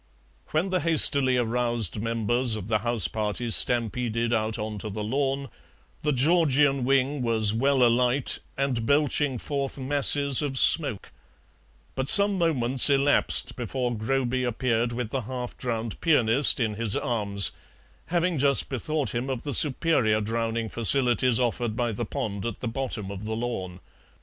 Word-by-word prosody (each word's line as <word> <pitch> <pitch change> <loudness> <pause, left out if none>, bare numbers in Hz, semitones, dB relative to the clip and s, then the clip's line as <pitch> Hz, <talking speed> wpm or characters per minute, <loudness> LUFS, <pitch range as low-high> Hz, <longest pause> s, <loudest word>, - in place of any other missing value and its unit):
When 170 +5 -2
the 185 - 0
hastily 140 -5 +4
aroused 120 -4 -1
members 115 +1 -1
of 105 -3 -7
the 110 -1 0
house 115 -5 +1
party 110 +5 -4
stampeded 120 0 +2
out 110 0 -1
on 105 -1 -6
to 105 - -7
the 105 +1 -6
lawn, 135 +4 -2 0.5
the 150 - -1
Georgian 145 -1 +1
wing 135 +2 0
was 110 -3 0
well 135 +3 +1
alight 125 +2 +1 0.2
and 130 -5 -2
belching 145 -2 0
forth 140 +2 -5
masses 140 0 +3
of 140 -3 -3
smoke, 140 - +3 0.8
but 130 0 -3
some 200 0 +5
moments 135 -6 +4
elapsed 140 +1 +1
before 125 0 -4
Groby 130 +3 -2
appeared 120 -1 -2
with 120 -2 -5
the 135 - -3
half 125 +1 -7
drowned 115 -3 -5
pianist 140 -4 +2
in 110 -3 -1
his 110 -1 +2
arms, 100 -4 -1 0.6
having 175 -2 -1
just 140 0 +4
bethought 140 0 -3
him 120 +3 -4
of 130 -3 -5
the 145 - -4
superior 130 -7 +2
drowning 115 +1 -3
facilities 120 +1 +2
offered 120 -2 -2
by 120 0 -2
the 115 +2 -5
pond 100 -1 -5
at 115 - -7
the 125 - -5
bottom 115 -5 -5
of 100 +1 -8
the 110 +1 -4
lawn. 95 -6 -6
125 Hz, 150 wpm, -25 LUFS, 115-140 Hz, 0.8 s, some